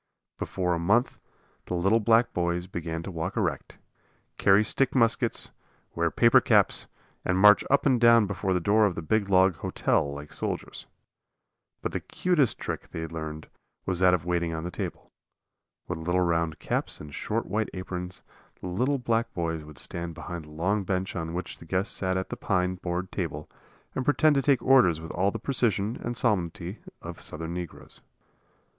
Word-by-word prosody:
Before 90 Hz, -2 st, -1 dB
a 85 Hz, -, -1 dB
month 105 Hz, +9 st, +2 dB, 0.5 s
the 90 Hz, -, -2 dB
little 95 Hz, +6 st, +3 dB
black 115 Hz, +2 st, +3 dB
boys 85 Hz, 0 st, -1 dB
began 85 Hz, -2 st, -5 dB
to 95 Hz, -, -6 dB
walk 90 Hz, +6 st, -4 dB
erect, 85 Hz, -10 st, -2 dB, 0.6 s
carry 100 Hz, +2 st, +5 dB
stick 135 Hz, +6 st, +1 dB
muskets, 115 Hz, -3 st, +1 dB, 0.4 s
wear -, -, +1 dB
paper -, -, +5 dB
caps, -, -, +3 dB, 0.4 s
and 90 Hz, -, +1 dB
march 105 Hz, +1 st, +7 dB
up 140 Hz, -, +3 dB
and 130 Hz, -4 st, +3 dB
down 115 Hz, -2 st, +7 dB
before 95 Hz, -1 st, -2 dB
the -, -, +2 dB
door 105 Hz, +4 st, +4 dB
of 90 Hz, -, -3 dB
the 80 Hz, -, -5 dB
big 100 Hz, +4 st, +1 dB
log 95 Hz, -2 st, +4 dB
"hotel" 70 Hz, -, 0 dB
like 75 Hz, +1 st, -8 dB
soldiers. -, -, -4 dB, 1.0 s
But -, -, -1 dB
the -, -, -2 dB
cutest 170 Hz, -, +1 dB
trick -, -, -5 dB
they 80 Hz, -, -5 dB
learned 80 Hz, -1 st, -6 dB, 0.4 s
was 90 Hz, -2 st, -1 dB
that 90 Hz, -1 st, +5 dB
of 85 Hz, -2 st, -5 dB
waiting 85 Hz, -2 st, 0 dB
on 80 Hz, -, -4 dB
the 90 Hz, -, -4 dB
table. -, -, -6 dB, 0.8 s
With -, -, -4 dB
little 90 Hz, +3 st, 0 dB
round 85 Hz, -2 st, 0 dB
caps -, -, -1 dB
and 75 Hz, -1 st, -10 dB
short -, -, -2 dB
white 110 Hz, +4 st, -1 dB
aprons, 90 Hz, -1 st, -4 dB, 0.4 s
the -, -, -9 dB
little 125 Hz, +10 st, +1 dB
black 115 Hz, -2 st, 0 dB
boys 80 Hz, -2 st, -2 dB
would 75 Hz, -2 st, -13 dB
stand 85 Hz, +5 st, -4 dB
behind 85 Hz, -2 st, -7 dB
the -, -, -14 dB
long 95 Hz, +7 st, 0 dB
bench 95 Hz, 0 st, -2 dB
on 80 Hz, -1 st, -4 dB
which 90 Hz, 0 st, -5 dB
the -, -, -12 dB
guests 95 Hz, +5 st, -1 dB
sat 95 Hz, -1 st, 0 dB
at 95 Hz, -, -3 dB
the -, -, -4 dB
pine 90 Hz, -1 st, 0 dB
board 90 Hz, 0 st, -4 dB
table 80 Hz, -5 st, -4 dB, 0.5 s
and 130 Hz, -, -2 dB
pretend 145 Hz, +3 st, +4 dB
to 140 Hz, -, +2 dB
take 135 Hz, -1 st, +2 dB
orders 125 Hz, -12 st, +5 dB
with 80 Hz, 0 st, -7 dB
all 95 Hz, +3 st, +1 dB
the 115 Hz, -, -4 dB
precision 115 Hz, -3 st, 0 dB
and 120 Hz, 0 st, -3 dB
solemnity 90 Hz, -4 st, -1 dB, 0.2 s
of -, -, -8 dB
Southern 80 Hz, +2 st, -5 dB
negroes. 90 Hz, -1 st, -8 dB
90 Hz, 180 wpm, -27 LUFS, 85-110 Hz, 1.0 s, march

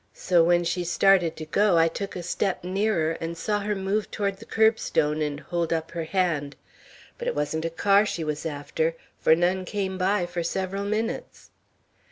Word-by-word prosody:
So 175 Hz, -2 st, +3 dB
when 175 Hz, +1 st, +3 dB
she 175 Hz, +1 st, -1 dB
started 175 Hz, -1 st, +3 dB
to 155 Hz, -, -7 dB
go, 195 Hz, +3 st, +3 dB
I 165 Hz, 0 st, +5 dB
took 195 Hz, +4 st, -5 dB
a 180 Hz, -, -5 dB
step 180 Hz, +2 st, -1 dB
nearer, 185 Hz, -3 st, +1 dB
and 165 Hz, +1 st, -4 dB
saw 210 Hz, +3 st, -1 dB
her 210 Hz, +1 st, -2 dB
move 195 Hz, +2 st, -1 dB
toward 200 Hz, -2 st, -2 dB
the 225 Hz, -, -13 dB
curbstone 160 Hz, -9 st, +2 dB
and 145 Hz, -1 st, -2 dB
hold 170 Hz, +2 st, -2 dB
up 160 Hz, -1 st, -1 dB
her 170 Hz, -2 st, -4 dB
hand. 160 Hz, -6 st, 0 dB, 0.6 s
But -, -, -4 dB
it -, -, -1 dB
wasn't 155 Hz, +2 st, -1 dB
a -, -, 0 dB
car 200 Hz, +5 st, +4 dB
she 170 Hz, -, -3 dB
was 150 Hz, -1 st, -3 dB
after, 160 Hz, +1 st, -2 dB, 0.2 s
for 160 Hz, -, +5 dB
none 180 Hz, +2 st, +1 dB
came 190 Hz, 0 st, -3 dB
by 185 Hz, 0 st, +2 dB
for 175 Hz, 0 st, -4 dB
several 190 Hz, +3 st, -2 dB
minutes." 220 Hz, +3 st, -3 dB
175 Hz, 190 wpm, -25 LUFS, 160-195 Hz, 0.6 s, I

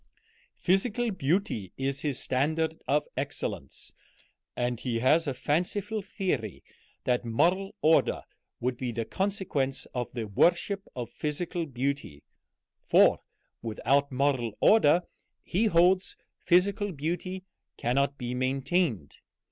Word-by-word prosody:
Physical 220 Hz, +5 st, +1 dB
beauty 165 Hz, -, -1 dB
is 135 Hz, +1 st, -1 dB
his 145 Hz, -4 st, -1 dB
standard 160 Hz, +5 st, 0 dB
of 145 Hz, +2 st, +2 dB
excellence, -, -, -4 dB, 0.6 s
and 120 Hz, -1 st, -1 dB
he 120 Hz, -2 st, -2 dB
has 150 Hz, +7 st, +3 dB
a 140 Hz, -, 0 dB
fanciful 180 Hz, -, -1 dB
theory 180 Hz, -, -3 dB, 0.4 s
that 125 Hz, -1 st, +1 dB
moral 175 Hz, +12 st, +1 dB
order 160 Hz, +1 st, +3 dB, 0.4 s
would 125 Hz, 0 st, -1 dB
be 125 Hz, -1 st, -3 dB
the 115 Hz, -1 st, -3 dB
consequence 150 Hz, -, -1 dB
of 125 Hz, -1 st, -3 dB
the 120 Hz, -3 st, -3 dB
worship 175 Hz, -, +2 dB
of 120 Hz, -2 st, -5 dB
physical 165 Hz, +3 st, -3 dB
beauty; 130 Hz, -, -3 dB, 0.6 s
for -, -, +5 dB, 0.4 s
without 140 Hz, +5 st, +1 dB
moral 130 Hz, -4 st, 0 dB
order 180 Hz, -5 st, +5 dB, 0.4 s
he 205 Hz, +6 st, 0 dB
holds 180 Hz, +1 st, +3 dB, 0.3 s
physical 200 Hz, +3 st, +3 dB
beauty 175 Hz, +4 st, -3 dB, 0.3 s
cannot 140 Hz, +3 st, 0 dB
be 125 Hz, -1 st, -4 dB
maintained. 135 Hz, -, 0 dB
145 Hz, 115 wpm, -28 LUFS, 125-180 Hz, 0.6 s, for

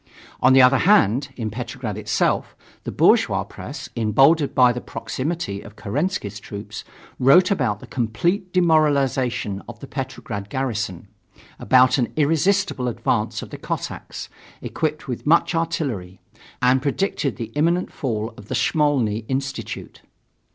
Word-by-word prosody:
On 130 Hz, -, +6 dB
the 135 Hz, -1 st, +7 dB
other 125 Hz, +1 st, +5 dB
hand, 140 Hz, -, +3 dB
in 110 Hz, -3 st, -4 dB
Petrograd 120 Hz, -1 st, -5 dB
itself, 105 Hz, 0 st, 0 dB, 0.3 s
the -, -, -3 dB
bourgeois -, -, +3 dB
press, -, -, -8 dB
emboldened 135 Hz, +7 st, +3 dB
by 125 Hz, -1 st, +5 dB
the 125 Hz, -, -5 dB
proximity 135 Hz, -, -4 dB
of 105 Hz, -2 st, -13 dB
Kerensky's 110 Hz, -, -3 dB
troops, 100 Hz, 0 st, -8 dB, 0.4 s
wrote 175 Hz, +9 st, +5 dB
about 120 Hz, -, 0 dB
the -, -, -9 dB
complete 170 Hz, -, -1 dB
demoralization 140 Hz, -, +2 dB
of 115 Hz, -2 st, -10 dB
the -, -, -8 dB
Petrograd 125 Hz, -7 st, -6 dB
garrison; 110 Hz, -8 st, -3 dB, 0.5 s
about 130 Hz, +4 st, +4 dB
an 120 Hz, -, 0 dB
irresistible 160 Hz, -1 st, +1 dB
advance 120 Hz, -, -1 dB
of -, -, -11 dB
the -, -, -8 dB
Cossacks, -, -, -5 dB, 0.4 s
equipped 155 Hz, -1 st, -3 dB
with 125 Hz, +2 st, -5 dB
much 170 Hz, +3 st, +4 dB
artillery; 140 Hz, -, -2 dB, 0.4 s
and 130 Hz, +1 st, +4 dB
predicted 140 Hz, -, -1 dB
the 115 Hz, +1 st, -6 dB
imminent 170 Hz, +4 st, +1 dB
fall 115 Hz, -5 st, -3 dB
of 105 Hz, -, -12 dB
the -, -, -3 dB
Smolny 140 Hz, -9 st, +1 dB
Institute. 135 Hz, +1 st, -4 dB
130 Hz, 135 wpm, -22 LUFS, 110-155 Hz, 0.5 s, the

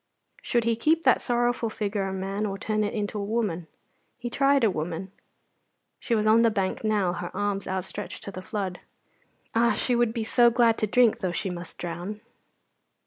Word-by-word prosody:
Should 240 Hz, -1 st, +1 dB
he 230 Hz, 0 st, +2 dB
keep 315 Hz, +8 st, +2 dB
that 260 Hz, -, +4 dB
sorrowful 240 Hz, -1 st, 0 dB
figure 205 Hz, -2 st, -2 dB
a 190 Hz, -, -3 dB
man 195 Hz, +2 st, -2 dB
or 195 Hz, -1 st, -4 dB
turn 215 Hz, +1 st, -1 dB
it 205 Hz, -, -2 dB
into 210 Hz, 0 st, -2 dB
a -, -, -2 dB
woman? 200 Hz, -6 st, -1 dB, 0.5 s
He 240 Hz, -1 st, -5 dB
tried 275 Hz, 0 st, +3 dB
a 220 Hz, -, +4 dB
woman. 170 Hz, +3 st, -4 dB, 0.9 s
She 235 Hz, -, 0 dB
was 215 Hz, -1 st, +1 dB
on 220 Hz, +2 st, +6 dB
the 230 Hz, -, +5 dB
bank 195 Hz, -2 st, -2 dB
now, 205 Hz, -5 st, +1 dB
her 175 Hz, 0 st, -4 dB
arms 205 Hz, -1 st, -1 dB
outstretched 190 Hz, +2 st, -4 dB
to 200 Hz, -, -6 dB
the 185 Hz, -, -7 dB
flood. 190 Hz, -2 st, -4 dB, 0.7 s
Ah! 235 Hz, 0 st, +3 dB
she 245 Hz, +3 st, 0 dB
would 240 Hz, -1 st, +2 dB
be 230 Hz, -1 st, -2 dB
so 240 Hz, +2 st, +5 dB
glad 235 Hz, -1 st, +3 dB
to 215 Hz, -, +1 dB
drink, 235 Hz, +1 st, +4 dB
though 185 Hz, -, -1 dB
she 185 Hz, +1 st, -2 dB
must 175 Hz, 0 st, -8 dB
drown. 175 Hz, +5 st, -5 dB
210 Hz, 195 wpm, -26 LUFS, 190-235 Hz, 0.9 s, on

